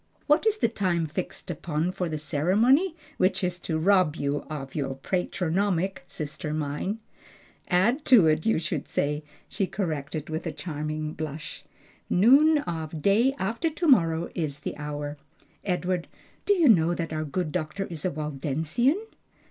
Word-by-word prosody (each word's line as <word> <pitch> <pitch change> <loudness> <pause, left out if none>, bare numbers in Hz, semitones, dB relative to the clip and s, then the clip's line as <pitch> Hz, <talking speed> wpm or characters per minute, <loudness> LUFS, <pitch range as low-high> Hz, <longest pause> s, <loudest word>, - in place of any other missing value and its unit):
What 300 +9 +3
is 440 0 +3
the 425 - +3
time 185 -7 0
fixed 160 +3 -5
upon 160 +1 -2
for 180 -2 -3
the 155 - -2
ceremony 215 - +2 0.2
which 185 +2 +2
is 180 0 -1
to 160 -2 -2
rob 180 -2 +3
you 140 -2 -1
of 135 -3 -6
your 135 -3 -2
patronymic, 185 +4 -1
sister 150 0 -5
mine?" 155 +7 -2 0.7
"Add 225 - +2
to 235 -9 +7
it, 155 0 +3
you 225 - +2
should 160 -2 -3
say," 150 +1 -1 0.2
she 195 - -1
corrected, 155 -6 -3
with 160 +2 -4
a - - -1
charming 155 0 -4
blush. 155 -1 -6 0.5
"Noon 275 - +6
of 160 - -4
day 230 +7 +4
after 230 - -1
to 330 +2 -2
morrow 165 - +4
is 150 -4 -3
the - - -4
hour. 145 0 -5 0.5
Edward, 180 -2 -1 0.4
do 410 - +6
you 340 -5 +4
know 175 -6 +5
that 165 -2 -3
our 155 0 -1
good 155 +2 -2
doctor 170 +3 -2
is 165 -4 -6
a 185 - +1
Waldensian?" 155 - 0
170 Hz, 155 wpm, -27 LUFS, 155-200 Hz, 0.7 s, to